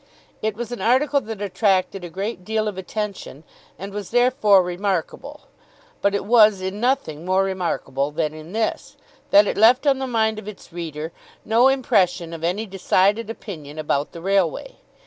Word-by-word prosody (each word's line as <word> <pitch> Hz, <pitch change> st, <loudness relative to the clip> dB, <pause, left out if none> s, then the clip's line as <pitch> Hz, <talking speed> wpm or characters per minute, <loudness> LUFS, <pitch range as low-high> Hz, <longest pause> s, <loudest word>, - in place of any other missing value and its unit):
It 215 Hz, -1 st, -1 dB
was 235 Hz, +1 st, -6 dB
an 240 Hz, -, -5 dB
article 275 Hz, +4 st, +2 dB
that 215 Hz, -3 st, -6 dB
attracted 195 Hz, -1 st, 0 dB
a 175 Hz, -, -6 dB
great 195 Hz, +2 st, -5 dB
deal 215 Hz, +1 st, -1 dB
of 210 Hz, -, -3 dB
attention 190 Hz, -5 st, -5 dB, 0.3 s
and 195 Hz, +2 st, -8 dB
was 205 Hz, -2 st, -5 dB
therefore 245 Hz, -5 st, +4 dB
remarkable, 195 Hz, -, -3 dB, 0.6 s
but 200 Hz, 0 st, +2 dB
it 200 Hz, -, -2 dB
was 215 Hz, -3 st, +5 dB
in 190 Hz, +2 st, -4 dB
nothing 240 Hz, -, -1 dB
more 185 Hz, +2 st, +2 dB
remarkable 170 Hz, -7 st, -2 dB
than 150 Hz, 0 st, -2 dB
in 155 Hz, +2 st, -11 dB
this, 220 Hz, +1 st, -3 dB, 0.3 s
that 205 Hz, +1 st, +7 dB
it -, -, -2 dB
left 245 Hz, +6 st, +5 dB
on 275 Hz, -2 st, +3 dB
the 265 Hz, -, -3 dB
mind 220 Hz, -3 st, 0 dB
of 210 Hz, -, -12 dB
its 205 Hz, -5 st, -11 dB
reader 160 Hz, -2 st, -5 dB, 0.3 s
no 230 Hz, +4 st, +4 dB
impression 185 Hz, -10 st, +1 dB
of 165 Hz, -1 st, -8 dB
any 185 Hz, +6 st, -1 dB
decided 200 Hz, +2 st, +1 dB
opinion 155 Hz, -10 st, -8 dB
about 150 Hz, -2 st, -1 dB
the 170 Hz, -, -10 dB
railway. 195 Hz, -, 0 dB
200 Hz, 170 wpm, -22 LUFS, 180-225 Hz, 0.6 s, that